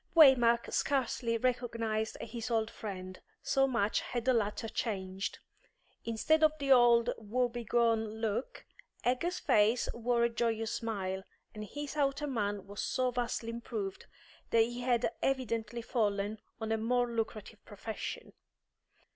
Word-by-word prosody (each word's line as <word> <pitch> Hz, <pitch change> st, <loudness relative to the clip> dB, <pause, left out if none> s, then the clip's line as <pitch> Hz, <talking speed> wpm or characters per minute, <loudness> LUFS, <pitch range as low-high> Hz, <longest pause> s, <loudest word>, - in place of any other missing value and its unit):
Waymark 245 Hz, -7 st, +6 dB
scarcely 245 Hz, -4 st, 0 dB
recognised 230 Hz, -3 st, -1 dB
his 235 Hz, 0 st, -5 dB
old 225 Hz, -1 st, 0 dB
friend, 185 Hz, -3 st, -7 dB, 0.2 s
so 270 Hz, 0 st, +3 dB
much 230 Hz, -5 st, +1 dB
had 240 Hz, -1 st, -4 dB
the 260 Hz, -, +4 dB
latter 225 Hz, 0 st, 0 dB
changed: 195 Hz, -4 st, -3 dB, 0.7 s
instead 310 Hz, +8 st, +2 dB
of 310 Hz, 0 st, +6 dB
the 280 Hz, -2 st, -1 dB
old 240 Hz, -2 st, +6 dB
woe 240 Hz, +4 st, 0 dB
begone 230 Hz, -2 st, 0 dB
look, 225 Hz, -, -3 dB, 0.4 s
Egger's 335 Hz, +9 st, 0 dB
face 240 Hz, -, +3 dB
wore 235 Hz, 0 st, +1 dB
a 235 Hz, -, +3 dB
joyous 225 Hz, -1 st, -1 dB
smile, 190 Hz, -5 st, -2 dB, 0.3 s
and 215 Hz, 0 st, -6 dB
his 290 Hz, +7 st, -6 dB
outer 285 Hz, 0 st, +1 dB
man 205 Hz, -7 st, -2 dB
was 200 Hz, 0 st, -6 dB
so 255 Hz, -1 st, 0 dB
vastly 235 Hz, -1 st, -2 dB
improved 225 Hz, -4 st, -5 dB, 0.4 s
that 230 Hz, -, +4 dB
he 240 Hz, +2 st, -4 dB
had 245 Hz, -1 st, +2 dB
evidently 235 Hz, -3 st, -1 dB
fallen 210 Hz, -2 st, 0 dB, 0.2 s
on 220 Hz, -1 st, -3 dB
a 225 Hz, -, +2 dB
more 245 Hz, +2 st, +1 dB
lucrative 225 Hz, -2 st, -4 dB
profession. 215 Hz, +1 st, -6 dB
230 Hz, 135 wpm, -32 LUFS, 220-250 Hz, 0.7 s, Waymark